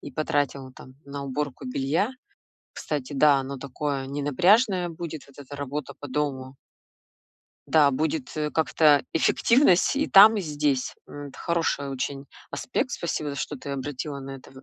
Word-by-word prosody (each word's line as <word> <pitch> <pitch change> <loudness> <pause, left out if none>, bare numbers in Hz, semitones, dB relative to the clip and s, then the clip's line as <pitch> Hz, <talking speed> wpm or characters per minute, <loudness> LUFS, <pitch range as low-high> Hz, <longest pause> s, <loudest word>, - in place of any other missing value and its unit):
и 145 - -9
потратил 140 -3 -2
там 130 0 -14
на 140 0 -6
уборку 145 - -4
белья, 170 - 0 0.6
кстати, 145 -2 -4
да, 145 +1 +5
оно 135 +1 -4
такое 140 +1 -3
ненапряжное 175 - +2
будет, 160 -3 -7
вот 140 - -20
эта 145 +1 -9
работа 145 +1 -5
по 145 - -7
дому. 135 -1 -3 1.1
Да, 150 -3 +5
будет, 155 +1 -2
э, 150 -1 -1
как-то 150 0 +3
эффективность 230 - +3
и 295 +2 +1
там, 215 0 +8
и - - 0
здесь. 145 -5 -1
М, 145 -1 -8
д - - -14
хороший 165 -4 -1
очень 135 +1 -4 0.2
аспект, - - -2
спасибо, 145 -2 -3
что 145 +1 -4
ты 140 - -8
обратила 140 +1 -5
на 135 0 -7
это 130 - -16
в 130 - -14
145 Hz, 155 wpm, -25 LUFS, 135-160 Hz, 1.1 s, там